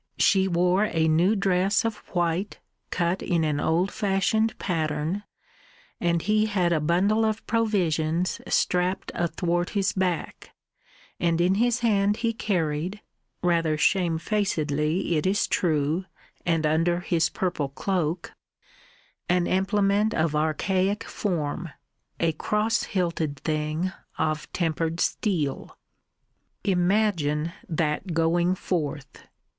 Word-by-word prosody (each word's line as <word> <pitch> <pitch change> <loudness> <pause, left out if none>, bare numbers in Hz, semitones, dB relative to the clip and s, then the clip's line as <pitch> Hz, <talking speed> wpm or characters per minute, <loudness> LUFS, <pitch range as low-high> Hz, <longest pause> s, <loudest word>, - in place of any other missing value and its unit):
She 190 -2 +4
wore 180 +3 +2
a 165 -5 +1
new 170 +7 +3
dress 195 +1 +2
of 225 -2 -1 0.2
white 175 +3 0 0.3
cut 175 +2 0
in 170 -3 0
an 150 -2 0
old 175 +6 +1
fashioned 210 +3 +1
pattern, 160 +1 -1 0.8
and 170 -1 +1
he 215 +2 +2
had 180 -5 +1
a 160 - +2
bundle 185 +8 +2
of 220 0 -1
provisions 180 -7 0
strapped 180 +1 0
athwart 175 0 -1
his 195 -1 +1
back, 180 -4 -3 0.6
and 170 -1 +1
in 180 +2 +3
his 240 +4 +1
hand 205 -2 +2
he 230 - +1
carried 180 -2 -2 0.4
rather 165 -3 +2
shame 170 0 +2
facedly 160 -4 0
it 155 - 0
is 200 +2 +2
true, 155 +1 0 0.4
and 165 -2 +2
under 165 +3 +2
his 170 -2 +1
purple 175 -7 -2
cloak 170 +2 -2 1.0
an 180 0 +3
implement 200 +3 +1
of 160 -1 +1
archaic 185 +7 0
form, 170 -3 -3 0.5
a 165 -1 +2
cross 210 +8 0
hilted 165 -6 -2
thing 155 +3 -1 0.3
of 155 -1 -1
tempered 165 -1 -1
steel. 160 -10 -1 0.9
Imagine 175 -5 +1 0.2
that 160 +2 -1
going 170 +2 +2
forth! 150 -6 -4
175 Hz, 115 wpm, -26 LUFS, 160-195 Hz, 1.0 s, She